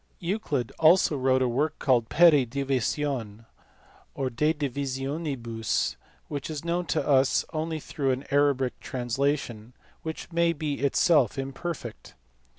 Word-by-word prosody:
Euclid 170 Hz, -, -2 dB
also 160 Hz, 0 st, +5 dB
wrote 130 Hz, -1 st, +2 dB
a -, -, +2 dB
work 145 Hz, +6 st, 0 dB
called 120 Hz, -5 st, +2 dB
Ilept 150 Hz, -6 st, +5 dB
AtaipeVecoi 130 Hz, -4 st, -2 dB, 0.7 s
or 130 Hz, -2 st, -2 dB
De 150 Hz, +6 st, +2 dB
Divisionibus, 135 Hz, -4 st, -2 dB, 0.3 s
which 145 Hz, -1 st, -5 dB
is 155 Hz, 0 st, -5 dB
known 170 Hz, +1 st, -1 dB
to -, -, -1 dB
us 135 Hz, -2 st, +3 dB
only 160 Hz, 0 st, -2 dB
through 140 Hz, -2 st, -3 dB
an 130 Hz, +2 st, -1 dB
Arabic 140 Hz, -3 st, +2 dB
translation 125 Hz, -2 st, -2 dB, 0.3 s
which 160 Hz, +2 st, -6 dB
may 170 Hz, 0 st, +2 dB
be 150 Hz, -2 st, -3 dB
itself 140 Hz, -2 st, +3 dB
imperfect. 135 Hz, -2 st, -6 dB
140 Hz, 125 wpm, -27 LUFS, 130-155 Hz, 0.7 s, also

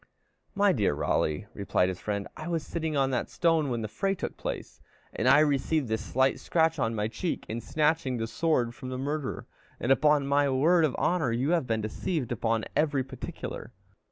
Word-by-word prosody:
"My 200 Hz, 0 st, +4 dB
dear 105 Hz, -, +1 dB
Raleigh," 75 Hz, +3 st, 0 dB
replied 95 Hz, -2 st, +1 dB
his 95 Hz, -, -5 dB
friend, 100 Hz, -2 st, -3 dB
"I 155 Hz, +1 st, -7 dB
was 165 Hz, -3 st, -1 dB
sitting 160 Hz, -3 st, -2 dB
on 135 Hz, -1 st, +2 dB
that 125 Hz, -, -1 dB
stone 165 Hz, -4 st, +2 dB
when 120 Hz, -2 st, -2 dB
the -, -, -2 dB
fray 195 Hz, -, -1 dB
took -, -, -5 dB
place, -, -, -6 dB, 0.3 s
and 120 Hz, -, -1 dB
I 145 Hz, -, +7 dB
received 145 Hz, -2 st, +1 dB
this 110 Hz, 0 st, -1 dB
slight 130 Hz, +4 st, +1 dB
scratch 160 Hz, -2 st, +1 dB
on 115 Hz, -2 st, 0 dB
my 105 Hz, 0 st, 0 dB
cheek 115 Hz, +10 st, -3 dB
in 115 Hz, +2 st, -4 dB
snatching 150 Hz, 0 st, +1 dB
the 115 Hz, -, -1 dB
sword 120 Hz, -2 st, 0 dB
from 130 Hz, -, -8 dB
the 130 Hz, -, -4 dB
murderer; 145 Hz, +1 st, -3 dB, 0.3 s
and 125 Hz, -, 0 dB
upon 145 Hz, +1 st, +4 dB
my 140 Hz, 0 st, +2 dB
word 160 Hz, +6 st, +4 dB
of 140 Hz, -, -1 dB
honor, 160 Hz, -9 st, +1 dB
you 125 Hz, +7 st, 0 dB
have 165 Hz, -7 st, +1 dB
been 110 Hz, -2 st, 0 dB
deceived 125 Hz, -, -3 dB
upon 115 Hz, -1 st, 0 dB
every 145 Hz, -4 st, +2 dB
particular." 130 Hz, -, -7 dB
135 Hz, 195 wpm, -28 LUFS, 115-155 Hz, 0.3 s, I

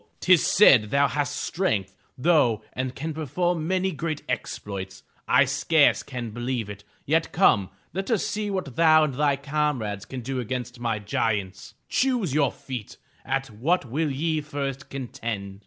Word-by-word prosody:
Tis 185 Hz, -3 st, +5 dB
said 125 Hz, -, +6 dB
thou 140 Hz, +3 st, +3 dB
hast 145 Hz, -2 st, -2 dB
strength, 110 Hz, -, -1 dB, 0.2 s
though, 125 Hz, -8 st, +3 dB
and 130 Hz, 0 st, -3 dB
can 160 Hz, +3 st, -4 dB
perform 160 Hz, +2 st, -1 dB
many 190 Hz, +1 st, +1 dB
great 155 Hz, -1 st, -4 dB
exploits! 100 Hz, -5 st, -5 dB, 0.2 s
I -, -, +5 dB
scarce -, -, +3 dB
can 120 Hz, -3 st, -6 dB
believe 120 Hz, -2 st, -3 dB
it! 100 Hz, 0 st, -10 dB, 0.2 s
Yet 160 Hz, +3 st, +1 dB
come, 100 Hz, -, +3 dB, 0.2 s
let 195 Hz, +5 st, -3 dB
us 225 Hz, -5 st, +1 dB
see 210 Hz, 0 st, -2 dB
what 185 Hz, -11 st, -3 dB
thou 155 Hz, -1 st, +6 dB
and 150 Hz, -3 st, 0 dB
thy 145 Hz, +1 st, +2 dB
comrades 140 Hz, -8 st, -2 dB
can 130 Hz, +1 st, -6 dB
do 130 Hz, +2 st, -3 dB
against 125 Hz, 0 st, -4 dB
my 115 Hz, -2 st, -1 dB
giants. 105 Hz, -2 st, -2 dB
Choose 245 Hz, -, +1 dB
your 150 Hz, -1 st, +4 dB
own -, -, -4 dB
feat. 125 Hz, -5 st, -7 dB, 0.3 s
At 135 Hz, -1 st, -2 dB
what 140 Hz, +10 st, 0 dB
will 150 Hz, +6 st, -1 dB
ye 155 Hz, +3 st, -1 dB
first 140 Hz, -2 st, -5 dB
contend?" 110 Hz, -7 st, -5 dB
135 Hz, 160 wpm, -25 LUFS, 115-160 Hz, 0.3 s, said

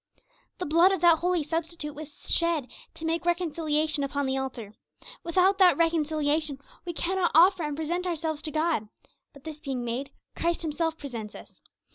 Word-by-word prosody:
The 365 Hz, -, -3 dB
blood 335 Hz, +5 st, +5 dB
of 385 Hz, -, 0 dB
that 340 Hz, -2 st, +6 dB
Holy 355 Hz, -2 st, +1 dB
Substitute 325 Hz, 0 st, -3 dB
was 300 Hz, 0 st, -11 dB
shed 335 Hz, -6 st, +2 dB, 0.2 s
'to 325 Hz, -, -7 dB
make 330 Hz, +1 st, 0 dB
reconciliation 315 Hz, -4 st, 0 dB
upon 280 Hz, 0 st, -1 dB
the 265 Hz, 0 st, 0 dB
altar.' 255 Hz, -6 st, -5 dB, 0.5 s
Without 370 Hz, +3 st, +2 dB
that 365 Hz, -2 st, +6 dB
reconciliation 310 Hz, -3 st, +1 dB, 0.3 s
we 345 Hz, -, -4 dB
cannot 360 Hz, +1 st, 0 dB
offer 360 Hz, +3 st, +6 dB
and 295 Hz, -2 st, -3 dB
present 345 Hz, +3 st, -2 dB
ourselves 320 Hz, -3 st, -2 dB
to 310 Hz, -, -2 dB
God; 310 Hz, -9 st, 0 dB, 0.4 s
but 280 Hz, -, -16 dB
this 310 Hz, -1 st, -7 dB
being 265 Hz, -5 st, -4 dB
made, 250 Hz, +4 st, -3 dB, 0.3 s
Christ 340 Hz, 0 st, -1 dB
Himself 320 Hz, +1 st, -1 dB
presents 230 Hz, -8 st, -7 dB
us. -, -, -14 dB
315 Hz, 165 wpm, -27 LUFS, 290-340 Hz, 0.5 s, that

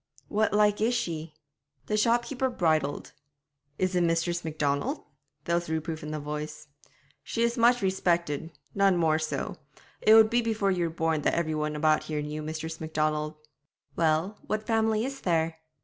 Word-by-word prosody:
'What 215 Hz, +1 st, +1 dB
like 210 Hz, 0 st, +3 dB
is 235 Hz, +3 st, +2 dB
she?' 165 Hz, -8 st, -3 dB, 0.5 s
The 210 Hz, -, -1 dB
shopkeeper 240 Hz, +4 st, +1 dB
bridled. 155 Hz, -, 0 dB, 0.6 s
'Is 185 Hz, 0 st, 0 dB
it 180 Hz, -, +3 dB
Mistress 170 Hz, +1 st, +1 dB
Macdonald?' 155 Hz, -, -1 dB, 0.4 s
There 170 Hz, -, -1 dB
was 170 Hz, -1 st, 0 dB
reproof 160 Hz, 0 st, -3 dB
in 150 Hz, -, -6 dB
the 155 Hz, 0 st, -3 dB
voice. 150 Hz, +1 st, -6 dB, 0.5 s
'She 230 Hz, -, -2 dB
is 235 Hz, 0 st, +1 dB
much 240 Hz, 0 st, +4 dB
respectet 170 Hz, -5 st, 0 dB, 0.2 s
none 195 Hz, -2 st, +3 dB
more 160 Hz, -2 st, +2 dB
so. 155 Hz, -1 st, -3 dB, 0.4 s
It 215 Hz, -, +7 dB
would 220 Hz, 0 st, +7 dB
be 240 Hz, +1 st, +3 dB
before 220 Hz, -4 st, 0 dB
you 175 Hz, -2 st, 0 dB
were -, -, -1 dB
born 160 Hz, -2 st, 0 dB
that -, -, +1 dB
every 160 Hz, -2 st, 0 dB
one 150 Hz, 0 st, -2 dB
about 155 Hz, +1 st, +2 dB
here 155 Hz, -1 st, -3 dB
knew 150 Hz, +1 st, -4 dB
Mistress 160 Hz, +1 st, -5 dB
Macdonald.' 155 Hz, -1 st, -1 dB, 0.6 s
'Well, 165 Hz, +5 st, +1 dB
what 215 Hz, 0 st, -2 dB
family 220 Hz, 0 st, +1 dB
is 270 Hz, 0 st, -6 dB
there?' 165 Hz, -2 st, 0 dB
170 Hz, 165 wpm, -28 LUFS, 155-215 Hz, 0.6 s, It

